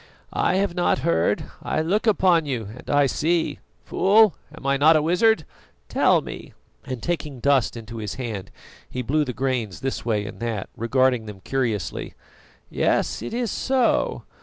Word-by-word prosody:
"I - - +1
have 195 -2 +1
not 175 0 +2
heard, 85 - +2 0.2
I 155 - -1
look 205 +7 0
upon 180 -7 +3
you 115 -7 -3
and 125 - -12
I 145 0 +4
see. 160 +5 0 0.3
Fool, 210 0 +4 0.2
am 135 - -12
I 140 0 +3
not 155 +4 +5
a 155 - +4
wizard? 180 +1 +3 0.4
Tell - - +3
me - - -9 0.2
" - - -34
and 130 -3 -5
taking 155 -6 -3
dust 135 -2 +2
into 115 0 -8
his 105 -2 -4
hand, 115 -7 -5 0.4
he 125 - -4
blew 150 +6 +1
the 130 - -3
grains 125 -7 -2
this 135 0 -3
way 105 -3 0
and - - -8
that, 115 -4 -3
regarding 125 0 +1
them 105 -2 -8
curiously. 120 -6 -2 0.5
"Yes, - - 0
it - - -5
is 235 -1 -1
so. 260 -2 +1
135 Hz, 170 wpm, -23 LUFS, 115-170 Hz, 0.5 s, not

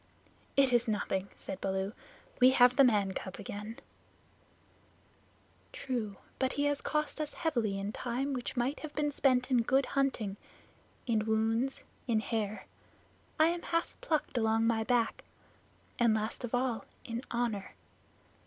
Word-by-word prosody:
"It 270 -2 +5
is 240 0 +3
nothing," 200 -2 -1
said 190 - -6
Baloo; 190 +1 -1 0.5
"we 255 - +8
have 250 0 +7
the 275 - +7
man 205 -6 +3
cub 190 0 -5
again." 210 +2 -6 1.9
"True, 225 -6 -3 0.2
but 260 0 +1
he 285 - 0
has 290 -1 +1
cost 300 0 -1
us 300 - -4
heavily 240 - 0
in 200 +1 -3
time 255 +5 -2
which 250 0 -4
might 255 +4 0
have 310 -1 -8
been 295 -1 +1
spent 255 -2 +2
in 245 -2 +5
good 265 +3 +3
hunting, 250 -8 0 0.7
in 220 -3 +1
wounds, 225 +4 +1 0.2
in 225 -3 +3
hair 215 -1 -2 0.7
I 315 +1 +6
am 345 0 -2
half 335 0 -1
plucked 305 -5 0
along 225 0 +2
my 225 -1 +2
back 235 -1 +1 0.8
and 235 -2 +4
last 220 +3 -3
of 240 0 -1
all, 245 -2 -1 0.2
in 230 +1 -3
honor. 235 -5 -2
240 Hz, 145 wpm, -32 LUFS, 220-270 Hz, 1.9 s, we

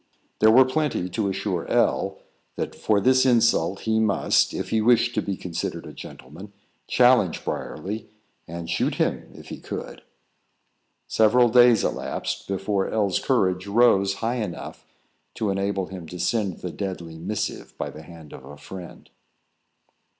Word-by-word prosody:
There 110 - +6
were 130 +4 +7
plenty 130 -9 -1
to 105 -1 -1
assure 95 -2 -3
L - - +1 0.4
that - - -4
for 105 -2 +1
this 130 +5 +4
insult 115 -8 +2
he 110 0 +1
must, 110 -3 +2
if - - -5
he 110 - +2
wished 120 +1 +3
to 110 - 0
be 100 -2 -4
considered 85 -2 -5
a - - -10
gentleman, 85 +11 -11 0.3
challenge 125 -8 +3
Briarly, 105 +7 -5 0.4
and 85 0 -7
shoot - - 0
him - - -1
if - - -12
he - - -7
could. - - -7 1.0
Several 120 +3 +4
days 120 -2 +6
elapsed - - -3
before 95 0 -1
L 105 -3 0
's - - +1
courage 95 -7 0
rose 100 -3 +3
high 120 +2 0
enough 95 -5 -7 0.5
to 105 -3 -1
enable 95 0 -1
him 90 -3 -9
to 90 - -8
send 95 +1 -1
the 90 - -4
deadly 85 -5 -6
missive 105 +5 -4
by - - -4
the 75 - -11
hand 80 -2 -13
of - - -11
a 75 - -11
friend. 90 +4 -11
100 Hz, 155 wpm, -24 LUFS, 90-115 Hz, 1.0 s, were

